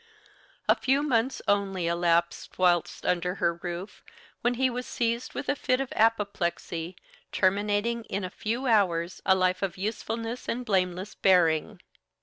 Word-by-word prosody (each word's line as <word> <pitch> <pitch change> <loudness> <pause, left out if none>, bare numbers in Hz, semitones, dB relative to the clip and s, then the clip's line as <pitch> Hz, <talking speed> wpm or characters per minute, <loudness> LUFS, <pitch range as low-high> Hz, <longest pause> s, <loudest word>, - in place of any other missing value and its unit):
A - - +7
few 275 +2 +1
months 255 -2 0
only 195 -3 +1
elapsed 170 0 0
whilst 175 -2 +1
under 180 +1 0
her 170 -3 +1
roof 175 +3 -7 0.4
when 245 +1 +1
he 260 +2 +2
was 250 0 -4
seized 235 +1 -2
with - - -4
a 285 - +1
fit 255 -2 0
of 270 -1 -3
apoplexy, 190 -6 0 0.4
terminating 205 +4 +1
in 200 0 -3
a 185 - -4
few 235 +5 -3
hours 185 -7 +1
a 190 - +6
life 185 0 +1
of 195 -2 -2
usefulness 225 +4 -4
and 245 +1 -2
blameless 185 -1 0
bearing. 180 +1 +2
200 Hz, 145 wpm, -27 LUFS, 180-230 Hz, 0.4 s, A